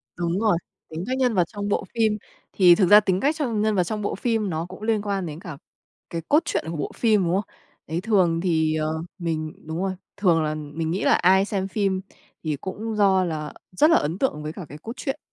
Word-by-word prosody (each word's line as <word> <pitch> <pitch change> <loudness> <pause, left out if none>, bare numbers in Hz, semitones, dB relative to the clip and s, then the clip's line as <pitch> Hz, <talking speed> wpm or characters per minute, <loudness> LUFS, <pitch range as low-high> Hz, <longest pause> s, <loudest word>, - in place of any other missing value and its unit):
Đúng 175 +2 -1
rồi, 215 -6 +3 0.3
tính 160 +2 -5
cách 260 +1 -1
nhân 250 -3 +2
vật 180 -4 +4
trong 205 +1 -5
bộ 205 - 0
phim. 220 -2 +2 0.4
Thì 180 -3 +7
thực 185 0 +3
ra 210 +1 +10
tính 190 -3 0
cách 290 +8 +1
trong 235 -8 -1
nhân 215 0 +1
vật 185 - +3
trong 210 +4 -3
bộ 205 - -2
phim 225 -2 0
nó 160 0 -2
cũng 185 +3 -11
liên 220 -2 +1
quan 200 -3 -2
đến 155 -1 -6
cả 170 -6 -8 0.5
cái 165 -1 -4
cốt 300 - +6
truyện - - -1
của 165 - -4
bộ 145 - -3
phim, 215 -5 +3
đúng 170 - 0
không? 200 0 -2 0.4
Đấy, 165 +3 -2
thường 185 -6 +2
thì, 160 -3 +1
ờ, 155 0 -1 0.2
mình 160 -3 -3
đúng 160 - -4
rồi, 195 - 0 0.3
thường 170 -5 +3
là 155 0 -1
mình 155 +2 -4
nghĩ 185 - -1
là - - +5
ai 190 +2 +4
xem 195 -2 -2
phim 195 -2 0 0.4
thì 155 -2 -1
cũng 215 +3 -4
do 195 -2 +4
là 155 -3 -4 0.2
rất 295 +12 +4
là 335 - +6
ấn 160 +5 -1
tượng 150 - -1
với 155 - -4
cả 180 -2 -8
cái 150 - -9
cốt 225 +10 -7
truyện. 270 +3 -4
190 Hz, 245 wpm, -24 LUFS, 165-210 Hz, 0.5 s, ra